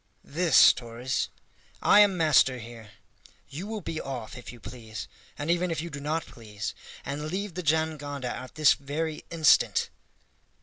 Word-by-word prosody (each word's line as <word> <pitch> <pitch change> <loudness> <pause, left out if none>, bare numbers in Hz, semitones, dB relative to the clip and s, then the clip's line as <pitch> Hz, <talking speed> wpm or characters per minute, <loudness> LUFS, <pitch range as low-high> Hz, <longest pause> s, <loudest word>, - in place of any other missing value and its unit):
"This, 170 +2 +6
Torres. 120 +2 -3 0.5
I 205 - +6
am 205 -3 +5
master 150 -5 +4
here. 115 -2 -10 0.6
You 165 +8 -6
will 220 -1 -4
be 160 -2 -4
off, 125 -5 -6
if 125 - -9
you 120 - -13
please, 110 -3 -8 0.3
and 145 +3 -1
even 175 +1 +1
if 165 -2 -2
you 170 +1 -5
do 140 - -6
not 155 +3 -2
please, 105 -3 -7 0.3
and 145 +2 -4
leave 195 +2 -3
the 180 - -4
jangada 150 -4 -1
at 130 0 -9
this 155 -1 +6
very 150 +3 -4
instant!" 160 -3 +3
145 Hz, 160 wpm, -27 LUFS, 125-165 Hz, 0.6 s, This